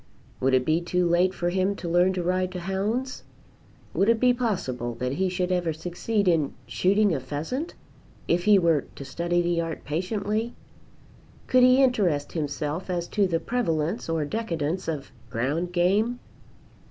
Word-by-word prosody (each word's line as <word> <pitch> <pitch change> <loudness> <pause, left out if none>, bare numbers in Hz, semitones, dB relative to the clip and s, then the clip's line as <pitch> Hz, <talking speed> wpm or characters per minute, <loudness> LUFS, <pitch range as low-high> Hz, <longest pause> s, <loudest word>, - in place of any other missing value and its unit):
Would 130 0 +3
it 130 -1 +2
be 160 +2 +2
too 180 +1 0
late 175 +2 +3
for 175 -1 -2
him 190 +2 +1
to 180 - -6
learn 175 +2 +3
to 180 -1 -2
ride 185 +1 0
to 180 - -4
hounds? 205 +8 -2 0.7
Would 200 - +2
it 230 -1 +3
be 250 +1 +4
possible 130 - -2
that 125 +1 -2
he 185 +7 0
should 180 0 -1
ever 175 -3 0
succeed 180 +6 -2
in 160 -5 +2
shooting 200 +1 +2
a 140 - 0
pheasant, 155 - -4 0.5
if 175 +1 +1
he 210 -1 +7
were 165 -6 +2
to 140 - -8
study 175 +5 0
the 170 -1 +1
art 165 -1 -5
patiently? 205 +8 -2 0.9
Could 255 - +4
he 255 +2 +6
interest 190 - +1
himself 150 +2 -3
as 175 -1 -2
to 205 -2 +2
the 165 -2 0
prevalence 170 -5 -1
or 160 -2 0
decadence 170 -3 -2
of 150 -5 -4 0.2
ground 140 +10 -1
game? 200 +7 +2
175 Hz, 165 wpm, -26 LUFS, 160-200 Hz, 0.9 s, he